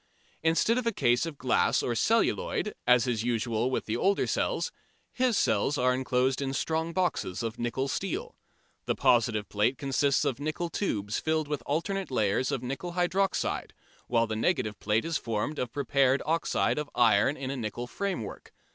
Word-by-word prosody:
Instead 165 +9 +2
of 240 - -3
a - - +3
case 120 - +2
of 155 -3 -7
glass 130 -2 +2
or 120 - 0
celluloid, 215 - +1
as 125 -1 +5
is 115 -3 -1
usual 120 0 0
with 130 - -2
the 110 - -2
older 195 +10 +2
cells, 485 - -1 0.4
his 250 -4 +1
cells 135 +8 +2
are 125 -1 +3
enclosed 130 +1 +1
in 135 -1 -2
strong 160 +3 -1
boxes 165 - -1
of 115 0 -4
nickel 120 +3 -1
steel. - - -3 0.5
The - - +1
positive 110 -3 +2
plate 105 +6 +1
consists 140 0 +1
of 130 - -1
nickel 155 +4 -2
tubes 105 - -1
filled 155 -1 0
with 150 -1 -3
alternate 190 +6 -1
layers 110 0 +1
of 125 - -2
nickel 140 +8 -4
hydroxide, 185 +2 0 0.3
while 115 -1 +2
the 110 -1 -3
negative 110 - 0
plate 105 +2 +1
is 165 -2 -1
formed 115 +6 -2
of 125 -2 -2
prepared 135 -1 +2
oxide 165 -1 +1
of 150 -1 -4
iron 115 +4 +4
in 135 -1 -4
a - - -3
nickel 120 -1 -4
framework. 185 - -5
130 Hz, 175 wpm, -28 LUFS, 115-160 Hz, 0.5 s, as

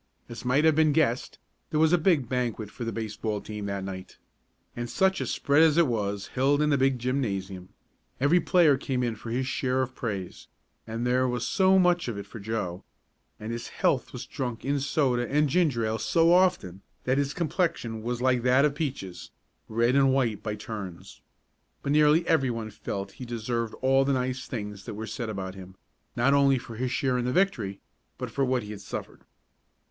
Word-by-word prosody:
As 115 - -8
might 135 +5 +2
have 160 - +6
been 155 0 +3
guessed, 140 -6 +1 0.3
there 155 - 0
was 160 +1 +4
a - - +6
big 160 -7 +2
banquet 120 -4 -2
for 120 - -7
the 115 - -2
baseball 110 -1 -3
team 105 0 -6
that 100 -1 -3
night. 95 -1 -7 0.6
And 120 0 -4
such 190 +6 +2
a - - -2
spread 145 +2 +2
as 160 -1 +5
it 170 - +6
was, 100 -5 -2
held 140 +3 +2
in 150 0 +2
the 140 - +3
big 135 -1 +3
gymnasium. 100 -8 -3 0.5
Every 145 +7 +4
player 165 -4 +4
came 130 -2 -1
in 120 -2 -1
for 115 - -9
his 125 +3 -1
share 130 0 -1
of 130 0 -5
praise, 100 -8 -5 0.4
and 115 +2 -3
there 130 +1 +2
was 125 -1 -2
so 190 0 +4
much 180 -3 +3
of 115 -4 -3
it 100 - -6
for 115 - -10
Joe; 100 -4 -4 0.6
and 110 +2 -5
his 115 0 -5
health - - 0
was - - -7
drunk 120 -3 -5
in 140 +1 +1
soda 130 -3 0
and 150 +1 +3
ginger 140 -7 +1
ale 110 +1 -1
so 165 +10 +3
often 175 - +2 0.2
that 130 +2 +1
his 140 0 -1
complexion 155 - -1
was 120 +2 -3
like 130 -2 +3
that 130 +3 +4
of 150 - +1
Peaches' 130 - -5 0.4
red 115 +3 +2
and 135 -1 +5
white 120 -6 +1
by 105 -1 -3
turns. 100 -6 -8 0.6
But 140 - -1
nearly 150 +3 +4
everyone 120 -7 +1
felt 100 -1 -5
that - - -20
he 130 - -7
deserved 115 -1 -3
all 135 +1 +4
the 140 +1 +1
nice 130 0 -2
things 105 -4 -6
that - - -6
were 110 +1 -5
said 115 0 -5
about 95 -3 -4
him, 95 -1 -11 0.4
not 125 +4 +3
only 140 -1 +4
for 120 -2 -8
his 125 +2 -2
share 130 -2 0
in 120 - -1
the 125 - 0
victory, 125 - 0 0.4
but - - -5
for 140 - 0
what 130 -2 +1
he 105 - -8
had 105 -2 -8
suffered. - - -7
125 Hz, 205 wpm, -27 LUFS, 110-140 Hz, 0.6 s, have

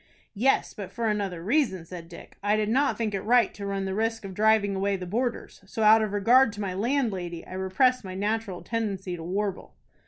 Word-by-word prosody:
"Yes, 250 +6 +1
but 200 -3 -7
for 235 -1 -2
another 195 -5 -2
reason," 215 - +1
said 170 -1 -9
Dick. 170 - -12
"I 205 +1 +2
did 215 -1 0
not 270 +5 +2
think 220 -3 -1
it 195 - -2
right 240 +3 +3
to 200 -1 -6
run 195 -1 -2
the 190 - -2
risk 225 +1 -1
of 190 - -7
driving 210 0 +3
away 195 +1 0
the 185 -1 -5
boarders; 235 +5 -3
so, 220 +2 -3
out 220 +1 +7
of 215 -2 -1
regard 230 +5 +4
to 205 - -9
my 195 -3 -2
landlady, 195 -6 -1
I - - -10
repressed 205 +7 +2
my 185 -1 -7
natural 205 -1 -2
tendency 200 -5 -3
to 170 - -9
warble." 195 +2 -3
205 Hz, 215 wpm, -27 LUFS, 190-225 Hz, -, out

